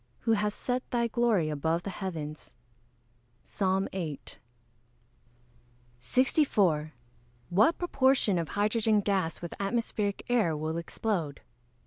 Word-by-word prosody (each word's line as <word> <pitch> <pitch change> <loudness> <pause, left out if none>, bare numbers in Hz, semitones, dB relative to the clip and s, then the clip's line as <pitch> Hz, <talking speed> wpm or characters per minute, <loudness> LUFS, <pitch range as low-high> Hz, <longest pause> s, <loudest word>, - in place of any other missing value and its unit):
who 225 - +1
hast 210 -1 0
set 250 0 -1
thy 235 -1 +1
glory 230 -8 +2
above 160 +3 -1
the 195 - -4
heavens." 160 -8 -6 0.9
PSALM 190 -1 0
VIII.] 165 -7 -4 1.8
64. 190 - +2 0.6
_What 215 - +4
proportion 265 - +2
of 165 - -3
hydrogen 215 0 +2
gas 190 -5 -1
with 170 - -5
atmospheric 205 -1 -1
air 215 -11 +2
will 155 +2 -2
explode? 170 -3 -2
195 Hz, 105 wpm, -29 LUFS, 165-225 Hz, 1.8 s, What